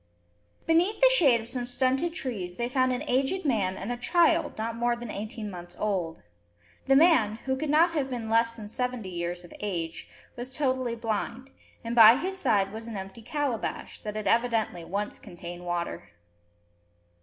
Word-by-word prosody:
Beneath 345 Hz, +6 st, +3 dB
the -, -, +7 dB
shade 270 Hz, -, +5 dB
of 225 Hz, -, -10 dB
some 245 Hz, 0 st, -3 dB
stunted 265 Hz, +6 st, +1 dB
trees 195 Hz, -, -4 dB
they 235 Hz, +3 st, -2 dB
found 255 Hz, 0 st, +2 dB
an 250 Hz, +3 st, -2 dB
aged 275 Hz, +9 st, 0 dB
man 200 Hz, -8 st, +1 dB
and 205 Hz, -, -4 dB
a 245 Hz, -, -2 dB
child 335 Hz, +7 st, +2 dB
not 225 Hz, +1 st, -3 dB
more 240 Hz, +1 st, +1 dB
than 235 Hz, -2 st, -7 dB
eighteen 215 Hz, +1 st, -5 dB
months 175 Hz, -1 st, -9 dB
old. 180 Hz, -, -2 dB, 0.6 s
The 270 Hz, -, +5 dB
man, 270 Hz, -9 st, +5 dB
who 265 Hz, 0 st, +1 dB
could 300 Hz, +3 st, -3 dB
not 325 Hz, +4 st, +5 dB
have 290 Hz, -5 st, -1 dB
been 240 Hz, -3 st, -4 dB
less 230 Hz, +1 st, +3 dB
than 220 Hz, -3 st, -9 dB
seventy 250 Hz, -2 st, -3 dB
years 175 Hz, 0 st, -4 dB
of 175 Hz, -, -13 dB
age, 170 Hz, -6 st, -4 dB, 0.3 s
was 250 Hz, +2 st, -7 dB
totally 255 Hz, -4 st, 0 dB
blind; 230 Hz, +3 st, -3 dB, 0.3 s
and 230 Hz, 0 st, -3 dB
by 225 Hz, 0 st, +10 dB
his 370 Hz, +6 st, -3 dB
side 210 Hz, -, +1 dB
was 225 Hz, +1 st, -7 dB
an 225 Hz, -3 st, -5 dB
empty 195 Hz, +4 st, -8 dB
calabash, 275 Hz, -1 st, -3 dB
that 210 Hz, 0 st, -6 dB
had 215 Hz, -1 st, -4 dB
evidently 230 Hz, -7 st, +1 dB
once 200 Hz, +5 st, -3 dB
contained 175 Hz, 0 st, -9 dB
water. 175 Hz, -1 st, -3 dB
235 Hz, 180 wpm, -28 LUFS, 205-265 Hz, 0.6 s, by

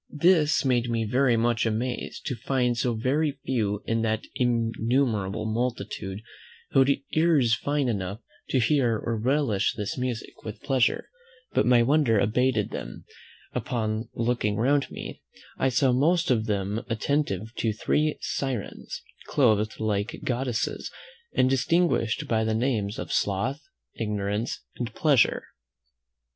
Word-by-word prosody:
This 155 Hz, -2 st, +3 dB
made 120 Hz, -2 st, +2 dB
me 115 Hz, -1 st, 0 dB
very 125 Hz, +2 st, +3 dB
much 115 Hz, 0 st, +2 dB
amazed 115 Hz, +3 st, -2 dB
to 130 Hz, -, -2 dB
find 125 Hz, -1 st, 0 dB
so 120 Hz, 0 st, 0 dB
very 140 Hz, +5 st, 0 dB
few 105 Hz, -5 st, -1 dB
in 115 Hz, 0 st, 0 dB
that 110 Hz, -1 st, 0 dB
innumerable 115 Hz, -3 st, 0 dB
multitude 110 Hz, -3 st, -3 dB, 0.5 s
who -, -, +4 dB
had 135 Hz, +1 st, +5 dB, 0.2 s
ears 155 Hz, -8 st, +4 dB
fine 145 Hz, +2 st, -1 dB
enough 100 Hz, -2 st, -2 dB, 0.3 s
to -, -, +2 dB
hear 120 Hz, -2 st, +2 dB
or 115 Hz, +2 st, -2 dB
relish 125 Hz, -2 st, +1 dB
this 105 Hz, +4 st, -3 dB
music 125 Hz, -3 st, -4 dB
with 110 Hz, -1 st, -8 dB
pleasure; 130 Hz, -3 st, +1 dB, 0.4 s
but -, -, +2 dB
my 120 Hz, -1 st, +6 dB
wonder 135 Hz, -3 st, +3 dB
abated 110 Hz, +1 st, +1 dB
when, -, -, -6 dB, 0.5 s
upon 110 Hz, -2 st, -2 dB
looking 115 Hz, -3 st, 0 dB
round 135 Hz, +5 st, +2 dB
me, -, -, -8 dB, 0.4 s
I 130 Hz, -, +3 dB
saw 130 Hz, +1 st, +3 dB
most 165 Hz, +6 st, +2 dB
of 110 Hz, -2 st, +1 dB
them 105 Hz, +1 st, -1 dB
attentive 115 Hz, -3 st, -1 dB
to 110 Hz, -, +1 dB
three 150 Hz, +8 st, 0 dB
Syrens, 130 Hz, -8 st, -4 dB, 0.2 s
clothed 110 Hz, -5 st, +2 dB
like 105 Hz, -1 st, -1 dB
goddesses, 125 Hz, -2 st, -2 dB, 0.5 s
and 130 Hz, -, +4 dB
distinguished 135 Hz, -3 st, +1 dB
by 110 Hz, -1 st, +1 dB
the 110 Hz, 0 st, 0 dB
names 110 Hz, -4 st, 0 dB
of -, -, -4 dB
Sloth, 115 Hz, +9 st, 0 dB, 0.3 s
Ignorance, 105 Hz, 0 st, -2 dB, 0.2 s
and 120 Hz, -1 st, -3 dB
Pleasure. 140 Hz, -7 st, +3 dB
120 Hz, 135 wpm, -26 LUFS, 110-135 Hz, 0.5 s, my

